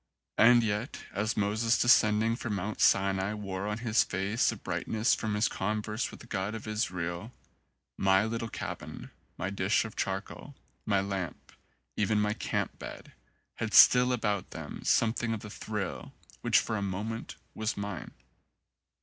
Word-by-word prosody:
And 120 +1 +7
yet, 110 +4 -2
as 105 +3 -1
Moses 110 +3 +2
descending 110 -2 +4
from 115 -3 -3
Mount 100 +3 -3
Sinai 100 +1 +3
wore 100 -1 -4
on 105 0 -2
his 115 -1 +2
face 100 +5 0
a - - -5
brightness 110 +2 0
from 110 -2 -1
his 105 +2 +3
converse 105 +3 -2
with - - -12
the - - -12
God 105 -1 -3
of 110 - -7
Israel, 90 -1 -3 0.7
my 95 +1 +4
little 115 0 -3
cabin, - - -7 0.3
my 95 +3 -3
dish 100 +4 +1
of 110 - -8
charcoal, 95 +8 -4 0.3
my 100 -2 +3
lamp, 95 -3 -5 0.4
even 105 +1 +1
my 105 0 +1
camp - - -3
bed, - - -9 0.4
had - - -2
still 125 0 +8
about 105 -6 -1
them - - -7
something 115 0 +2
of 105 - -7
the 105 - -9
thrill 105 -3 -5 0.3
which - - +3
for 110 - +1
a - - -2
moment 105 +4 -4 0.2
was 110 0 -2
mine. 100 -4 -5
105 Hz, 155 wpm, -30 LUFS, 100-115 Hz, 0.7 s, still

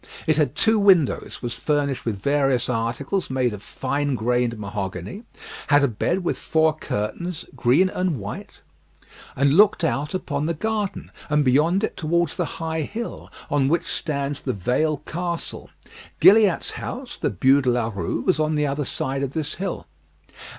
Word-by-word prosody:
It 155 -2 +2
had 145 -3 +1
two 220 -1 +3
windows, 185 -12 +3
was 120 -1 -3
furnished 140 +1 -1
with 110 -4 -1
various 135 +1 +1
articles 125 - -1
made 130 -3 0
of 105 - -8
fine 140 +4 -2
grained 120 0 0
mahogany, 100 - -5 0.4
had 145 -1 +5
a - - +5
bed 175 - -1
with - - -1
four 160 0 +2
curtains, 155 +8 -4
green 130 +10 +4
and 180 -4 -1
white, 100 0 -8 0.7
and 140 +1 +3
looked 200 0 +5
out 150 0 -1
upon 150 -5 -2
the 170 - -1
garden, 210 +2 -3 0.2
and 150 0 +2
beyond 160 +10 +3
it - - -1
towards 170 0 0
the - - -1
high 160 -1 -2
hill, 225 +10 -6 0.2
on 140 -2 +2
which 170 +4 +1
stands 140 -3 -3
the 130 - -2
Vale 130 - 0
Castle. 170 +1 -5 0.5
Gilliatt's 205 -3 +5
house, 255 0 -6
the - - 0
Bû 130 +9 +4
de 130 - +1
la 120 -2 +1
Rue, 90 -4 -2
was 185 -4 +1
on 155 0 +1
the 150 0 +1
other 140 0 -1
side 135 +2 -2
of 140 -1 -3
this 155 -2 -2
hill. 195 - -3
145 Hz, 165 wpm, -23 LUFS, 125-170 Hz, 0.7 s, had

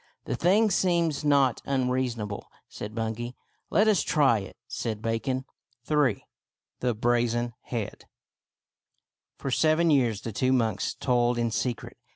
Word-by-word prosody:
" - - -50
The - - -2
thing 205 +5 +3
seems 170 -5 +1
not 140 -4 +3
unreasonable," 125 -5 -1 0.2
said 105 +1 -8
Bun 115 -1 -1
gay 120 +2 -6 0.2
" - - -45
Let 210 +2 +3
us 210 -4 +4
try 140 -8 +3
it," 95 - -9
said 110 -2 -3
Bacon, 120 +4 -2 0.4
III. 145 -9 +2 0.5
THE 125 -2 0
BRAZEN 120 +1 +1
HEAD 115 -5 -5 1.3
For 135 - -4
seven 160 +4 +3
years 120 -7 +2
the 115 - -5
two 130 +5 +1
monks 115 -4 0
toiled 120 -1 +1
in 120 -1 0
secret. 120 +1 -3
125 Hz, 145 wpm, -27 LUFS, 115-145 Hz, 1.3 s, us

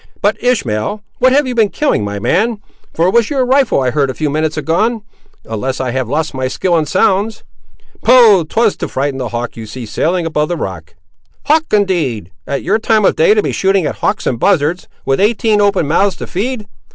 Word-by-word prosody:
But, - - 0
Ishmael, 205 - -1 0.2
what 255 - +4
have 285 +2 +3
you 255 - -3
been 225 -4 +2
killing, 290 - 0
my 100 0 -4
man; 210 - 0 0.3
for 165 - 0
it 185 - +1
was 235 -2 +3
your 270 -3 0
rifle 260 - +2
I 130 -1 0
heard 140 -1 0
a 130 - -4
few 150 -2 -2
minutes 155 +1 -1
agone, 215 +7 0 0.4
unless 120 +4 -4
I 130 -2 -2
have 130 -2 -2
lost 155 +3 -1
my 130 -1 -2
skill 175 +6 0
in 155 -2 +1
sounds." 205 +6 +1 0.6
"Poh! 225 -8 +6
'twas 220 +7 +1
to - - -4
frighten 135 0 -2
the 125 -3 -3
hawk 120 +1 -4
you 115 -1 -8
see 120 +3 -7
sailing 170 - -1
above 150 -2 -1
the 175 - -2
rock." 85 - -6 0.5
"Hawk, 315 +3 +3
indeed! 160 - 0 0.2
at 140 - -3
your 215 +3 +1
time 220 -2 +2
of - - +3
day 460 -2 +4
to 425 - +2
be - - -1
shooting 195 -2 +1
at - - -3
hawks - - -1
and 120 - -1
buzzards, 175 -1 +1 0.2
with 135 0 +1
eighteen 210 0 +2
open 200 -6 +2
mouths 190 +5 +2
to - - -7
feed. 220 +3 -3
175 Hz, 210 wpm, -15 LUFS, 135-220 Hz, 0.6 s, Poh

